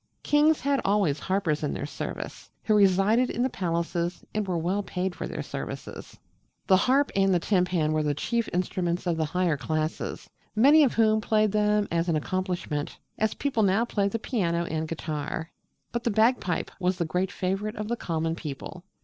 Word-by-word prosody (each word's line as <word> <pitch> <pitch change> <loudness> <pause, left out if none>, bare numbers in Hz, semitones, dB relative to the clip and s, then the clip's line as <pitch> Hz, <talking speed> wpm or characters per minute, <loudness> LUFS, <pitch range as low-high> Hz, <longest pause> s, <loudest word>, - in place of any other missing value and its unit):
Kings 300 +1 +3
had 280 0 +1
always 195 -8 +2
harpers 185 -5 0
in 150 - -1
their - - -3
service, - - -6
who 215 - +2
resided 205 +4 +4
in 240 - -1
the 260 - 0
palaces 170 0 -2
and 210 -2 -1
were 180 -2 0
well 180 +5 0
paid 185 -1 -3
for - - -5
their - - -5
services. - - -7 0.5
The 190 - +5
harp 265 +8 +3
and 195 0 +3
timpan 180 -4 +1
were 155 0 +1
the 150 -1 0
chief 230 - -1
instruments 175 0 -1
of 175 -2 +1
the 160 -1 0
higher 170 0 0
classes, 155 +3 -3 0.3
many 285 +8 +7
of 265 - +2
whom 220 -1 +3
played 215 -1 +2
them 210 0 +2
as 170 +1 0
an 165 - +2
accomplishment, 175 -2 -2 0.2
as 220 0 +1
people 275 -6 0
now 200 +3 +3
play 205 -4 0
the 200 - -1
piano 170 -8 -1
and 160 0 -2
guitar. 160 0 -4 0.4
But 235 0 -3
the - - +1
bagpipe 220 -4 +1
was 180 0 0
the 170 - 0
great 180 +4 -1
favourite 195 +4 -2
of 210 0 -4
the 240 - 0
common 165 -6 -2
people. 160 +2 -7
185 Hz, 185 wpm, -27 LUFS, 165-215 Hz, 0.5 s, many